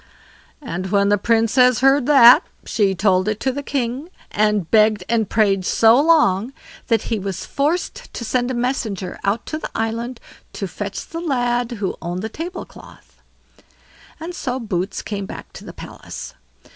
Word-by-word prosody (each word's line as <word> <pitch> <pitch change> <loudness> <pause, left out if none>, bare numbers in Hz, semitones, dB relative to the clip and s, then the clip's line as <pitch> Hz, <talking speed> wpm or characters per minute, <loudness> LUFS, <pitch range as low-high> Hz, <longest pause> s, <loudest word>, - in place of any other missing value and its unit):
And 185 -6 -4
when 200 +1 +2
the 205 - +4
Princess 235 +3 +3
heard 270 -1 +4
that, 270 0 +8 0.2
she 200 -3 +1
told 185 0 +2
it 215 0 -1
to 265 - +1
the 285 +2 -4
king, 275 +2 -3 0.2
and 210 -4 +1
begged 215 -3 +4
and 225 -3 0
prayed 200 -4 +2
so 225 +7 +4
long, 275 - +3 0.3
that 230 -3 +2
he 225 -3 -2
was 190 -1 -5
forced 305 +6 -2
to 235 - -5
send 245 +2 0
a 260 - -2
messenger 230 -7 -3
out 200 +4 -1
to 310 - -4
the - - -6
island 230 +2 -3 0.3
to 195 - -4
fetch 200 +2 -6
the 330 +1 -6
lad 245 -5 0
who 200 -4 -3
owned 175 +2 -4
the 220 - -3
table 345 - -6
cloth; - - -17 1.0
and 330 +3 -6
so 260 -7 -3
Boots 195 -5 -3
came 200 -2 -5
back - - -10
to - - -10
the - - -9
palace. - - -9
230 Hz, 170 wpm, -20 LUFS, 200-260 Hz, 1.0 s, that